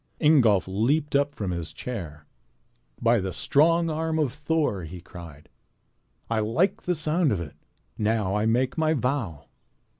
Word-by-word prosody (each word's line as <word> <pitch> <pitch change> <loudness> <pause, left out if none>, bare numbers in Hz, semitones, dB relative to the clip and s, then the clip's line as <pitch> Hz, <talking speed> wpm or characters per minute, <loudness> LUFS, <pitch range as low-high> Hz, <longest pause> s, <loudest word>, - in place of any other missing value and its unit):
'" - - -40
Ingolf 125 - +4
leaped 140 +11 0
up 140 0 +1
from 100 -4 -3
his 85 -3 -4
chair. 80 -12 -7 0.7
"By 115 0 +3
the 95 -1 -3
strong 165 - +3
arm 160 +1 -1
of 145 -6 0
Thor!" 150 - -1
he 85 +3 -8
cried, 85 -4 -12 0.8
"I 115 -1 0
like 115 - +1
the 180 - -1
sound 155 +1 +1
of 100 - 0
it. 80 -4 -7 0.5
Now 105 -3 0
I 105 +1 +1
make 125 +7 +1
my 160 0 +2
vow." 120 - -2
115 Hz, 155 wpm, -26 LUFS, 95-150 Hz, 0.8 s, Ingolf